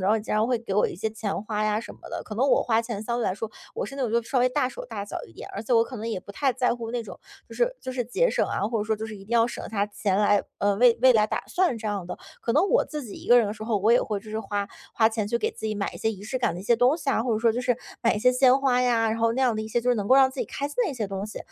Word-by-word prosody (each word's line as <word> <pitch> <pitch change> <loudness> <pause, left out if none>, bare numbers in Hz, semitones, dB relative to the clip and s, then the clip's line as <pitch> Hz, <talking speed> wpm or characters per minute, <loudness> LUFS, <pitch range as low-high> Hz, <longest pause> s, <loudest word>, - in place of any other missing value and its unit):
时 185 - -1
候 220 - +4
也 - - -2
经 210 - -3
常 215 +2 +2
会 245 -2 +1
给 210 -4 -5
我 210 - +3
一 - - -8
些 220 - -1
钱 210 -2 -4
花 215 -1 -1
呀 215 0 +1
什 230 - -8
么 - - -23
的， - - -4
可 215 - -7
能 245 - +1
我 - - +4
花 225 -1 +2
钱 230 -3 -5
相 235 +1 -1
对 235 - -1
来 - - +1
说 215 +3 -5 0.3
我 - - -2
是 - - -9
那 275 - -3
种 240 - -1
就 235 +1 +2
稍 260 -3 +2
微 250 - +4
大 255 0 0
手 - - -8
大 220 -4 -6
脚 205 - -6
一 - - -17
点， - - -10
而 200 - -5
且 235 - -2
我 230 -1 +5
可 260 - -10
能 225 -1 -4
也 220 - -2
不 200 - -12
太 270 +4 +1
在 250 -2 +1
乎 230 -1 -6
那 245 - -2
种， - - -9 0.3
就 - - -11
是 - - +1
就 260 - -5
是 250 -1 -2
节 - - +1
省 - - +1
啊， - - -2
或 225 +2 0
者 - - -2
说 220 0 0
就 220 +1 -5
是 215 - -8
一 195 - -12
定 - - -22
要 230 - +5
省 240 - -6
下 205 -2 +1
钱 205 -2 -1
来， 205 -1 +3 0.2
呃， 205 0 +2
为 235 +1 +5
未 260 -1 +8
来 215 -2 +4
打 - - -2
算 360 -9 +1
这 220 -1 -6
样 200 -4 -2
的， - - -6 0.2
可 - - -2
能 315 +7 +4
我 - - +4
自 300 -3 -6
己 210 - -9
一 - - -11
个 245 - +8
人 230 - +3
的 205 - -3
时 215 0 -9
候， 225 -2 0
我 210 +3 +3
也 245 - +5
会 210 -2 -2
就 215 +1 -12
是 220 +1 -2
花 205 -2 -3 0.3
花 220 - +4
钱 220 -2 -3
去 235 - +1
给 - - 0
自 - - -6
己 215 - -2
买 200 -1 -2
一 - - -9
些 220 - 0
仪 200 -3 -8
式 230 +5 -3
感 240 -9 0
的 175 - -6
一 - - -8
些 235 +3 +3
东 250 +6 +4
西 295 -4 -2
啊， 225 - +1
或 240 -1 0
者 - - 0
说 230 0 +3
就 245 - -2
是 250 -1 +1 0.3
买 230 - +3
一 - - -2
些 250 +3 +4
鲜 255 +1 +5
花 255 -2 +2
呀， 230 -3 +2
然 225 - -2
后 230 0 +2
那 260 +3 0
样 245 -3 +3
的 215 - -2
一 220 - -7
些 240 +2 0
就 250 - +2
是 - - +3
能 205 -1 -3
够 260 - +7
让 265 -1 +6
自 265 - -6
己 - - -2
开 280 - -3
心 290 - -9
的 365 - -1
一 - - -6
些 220 -5 -2
东 195 +1 -4
西。 215 - -7
225 Hz, 405 characters per minute, -25 LUFS, 210-250 Hz, 0.3 s, 未